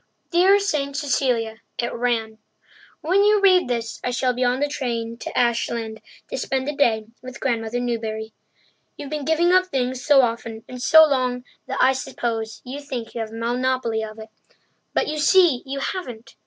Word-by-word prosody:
Dear 370 +3 +5
Saint 290 -8 -1
Cecilia 245 -6 0 0.2
[it 240 - -2
ran], 225 -2 -1 0.6
when 375 +6 +3
you 420 0 +4
read 370 -5 +5
this 230 -2 -3
I - - -1
shall 250 0 0
be 250 +1 -1
on 250 +1 +1
the 290 - +1
train 235 -5 -3
to - - -6
Ashland 235 -2 0 0.3
to - - -3
spend 265 0 -2
the 295 - -2
day 225 -6 +2 0.2
with 255 -1 -9
Grandmother 235 -2 -1
Newbury. 220 -2 -3 0.6
You've 285 0 -8
been 300 -2 -3
giving 330 +3 +3
up 370 0 +4
things 255 -5 -2
so 285 -2 +6
often 230 -1 -3
and 250 -1 -8
so 315 +4 +8
long 255 -4 0 0.2
that - - -3
I 260 +1 +5
suppose 225 -4 -4
you 265 +3 -6
think 255 -6 -6
you 230 - -3
have 220 - -4
a 225 - -10
monopoly 240 -1 -1
of 215 0 -8
it; 220 0 -10 0.7
but - - +2
you 305 0 -3
see 330 -5 +5
you 275 +1 -4
haven't. 270 -5 -5
250 Hz, 180 wpm, -22 LUFS, 230-285 Hz, 0.7 s, so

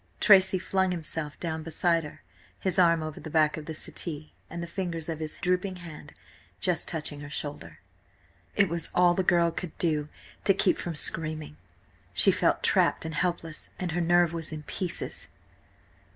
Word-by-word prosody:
Tracy 190 -2 +6
flung 190 +1 0
himself 160 -4 -3
down 160 -2 -3
beside 165 +1 +1
her, 150 - -11 0.4
his 190 -1 0
arm 170 -2 +4
over 155 -1 -6
the 155 - -8
back 155 -1 +3
of 155 -1 -8
the 160 - -5
settee 155 -1 -5 0.2
and 170 0 -5
the - - -3
fingers 170 -2 -4
of 160 -2 -4
his 155 -1 -3
drooping 180 +1 0
hand 170 -4 -11 0.4
just - - 0
touching 150 -2 -3
her 145 0 -8
shoulder. 145 - -6 0.8
It 200 - +4
was 170 -2 -2
all 175 -1 +5
the 190 - +1
girl 175 -2 +3
could 170 -1 -6
do 150 -3 0 0.3
to 195 - +4
keep 190 - +2
from 170 -2 -4
screaming. 155 - 0 0.6
She - - +7
felt - - +1
trapped - - +3
and 160 - -4
helpless, 165 -1 -2
and 180 -2 -3
her 175 +2 -1
nerve 175 0 +3
was 165 -2 -3
in 155 -1 -6
pieces. 175 +3 -2
165 Hz, 175 wpm, -28 LUFS, 155-180 Hz, 0.8 s, She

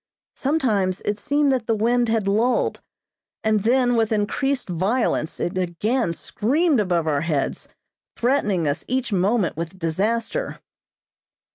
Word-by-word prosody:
Sometimes 220 - 0
it 205 0 -2
seemed 290 +1 +2
that 255 -4 -1
the 225 - +2
wind 235 +2 +2
had 220 -3 0
lulled, 225 +5 +1 0.6
and 220 -1 +2
then 245 +2 +3
with 225 -1 +1
increased 255 +6 0
violence 185 -1 0
it 175 - -2
again 185 +5 0
screamed 275 - +1
above 175 -5 +1
our 145 -3 +1
heads, 155 -4 -2 0.5
threatening 210 - +1
us 145 - -1
each 255 -3 -1
moment 195 +1 +1
with 170 +3 -5
disaster. 215 - -1
220 Hz, 130 wpm, -23 LUFS, 185-250 Hz, 0.6 s, then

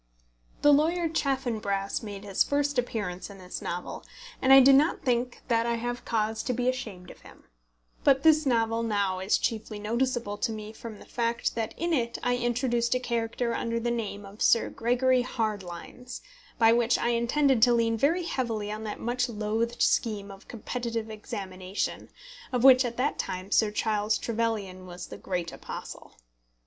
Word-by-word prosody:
The 290 - +7
lawyer 330 +4 +2
Chaffanbrass 230 -10 -1
made 205 -3 -7
his 195 -2 +2
first 285 -1 0
appearance 205 -7 -3
in 200 - -11
this 180 -1 -7
novel, 175 +1 -5 0.4
and 260 - +3
I 270 - +11
do 270 +1 +7
not 295 +5 +3
think 245 -1 -1
that 230 -1 +2
I 235 - +1
have 240 +1 -4
cause 220 -1 0
to 250 - -2
be 245 +1 -1
ashamed 215 -8 -3
of - - -15
him. - - -16 0.6
But 270 -1 +4
this 310 -1 +6
novel 230 -2 +2
now 200 -4 0
is 190 +3 +2
chiefly 220 -1 -3
noticeable 235 0 -1
to 225 - 0
me 215 0 -7
from 225 -1 -9
the - - -14
fact 235 -1 -1
that 225 -1 -3
in 340 0 -1
it 235 -5 0
I 245 0 +2
introduced 240 0 0
a - - +1
character 235 -1 -2
under 230 0 -1
the 240 +1 -1
name 210 -3 -4
of 200 +2 -13
Sir 230 - +3
Gregory 250 +2 +2
Hardlines, 215 0 -5 0.4
by 225 -1 +6
which 235 0 +3
I 235 - 0
intended 240 +2 +2
to 240 +1 +6
lean 230 -1 +2
very 315 +10 +2
heavily 230 -10 -2
on 215 +1 -5
that 210 - -5
much 245 +1 -1
loathed 225 +2 -1
scheme 205 -3 +1
of 195 0 -14
competitive 230 -1 -4
examination, 195 -3 -5 0.4
of 250 -2 0
which 260 -1 +8
at 235 -1 -4
that 265 +4 0
time 185 +2 -4
Sir 215 -1 +4
Charles 210 0 0
Trevelyan 215 -5 -2
was 175 0 -8
the - - -9
great 175 -3 -3
apostle. - - -9
230 Hz, 175 wpm, -28 LUFS, 210-250 Hz, 0.6 s, I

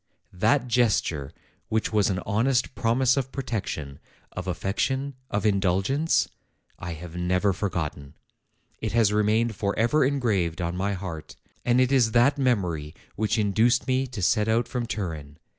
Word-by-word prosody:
that 115 +8 +2
gesture 105 - +1 0.4
which 110 0 -1
was 105 -1 +3
an 95 - 0
honest 125 +5 +1
promise 125 +3 +2
of 135 -1 -1
protection, 100 - -4 0.3
of - - -6
affection, 130 +10 -1 0.2
of 105 - -1
indulgence, 100 - +2 0.5
I 85 0 -5
have 85 +1 -9
never 90 +3 +1
forgotten; 80 -7 -4 0.6
it - - -3
has 110 -3 +3
remained 110 +2 +2
forever 115 +8 +1
engraved 110 - 0
on 85 0 -2
my 100 +2 -1
heart; 85 -5 -7 0.3
and 120 +1 +3
it 130 +1 +3
is 120 -5 +3
that 120 +4 +4
memory 90 - 0 0.2
which 110 +2 0
induced 110 +6 +2
me 130 +1 +1
to 120 -7 -6
set 105 +3 +2
out 115 +1 +2
from 120 -1 -3
Turin. 80 -10 -5
105 Hz, 145 wpm, -26 LUFS, 90-125 Hz, 0.6 s, that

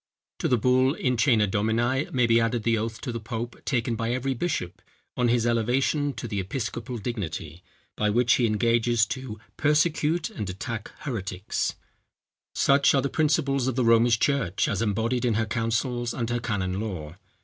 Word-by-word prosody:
To - - 0
the 125 - +3
bull 130 +4 +3
In 125 -1 0
Cœna 115 -3 +3
Domini 115 +7 0
may 125 -2 +2
be 115 0 +4
added 115 0 0
the 115 0 +2
oath 115 +1 -3
to 125 - -4
the 115 - -4
pope 115 +2 -6
taken 120 -3 0
by 115 +1 -2
every 130 +2 -1
bishop 120 - -3 0.3
on 125 - +1
his 120 -1 +2
elevation 130 +5 +1
to 120 0 -6
the 105 -3 -3
episcopal 120 +4 -4
dignity, 90 -7 -5 0.3
by 105 - +1
which 120 +2 +3
he 120 - +3
engages 115 +1 +2
to 125 -3 -6 0.2
persecute 155 +2 +1
and 105 -3 -5
attack 110 +4 -5
heretics. 100 -7 -3 0.8
Such 140 +1 +4
are 135 - +3
the 140 - 0
principles 140 -4 +1
of 130 - -1
the 125 -2 +1
Romish 115 0 +5
church 120 - +1
as - - -1
embodied 115 +3 0
in 120 -3 +1
her 115 +1 +1
councils 115 +2 -1
and 120 -3 -2
her 120 - 0
canon 100 -5 -2
law. 90 -8 -5
115 Hz, 175 wpm, -26 LUFS, 110-130 Hz, 0.8 s, Romish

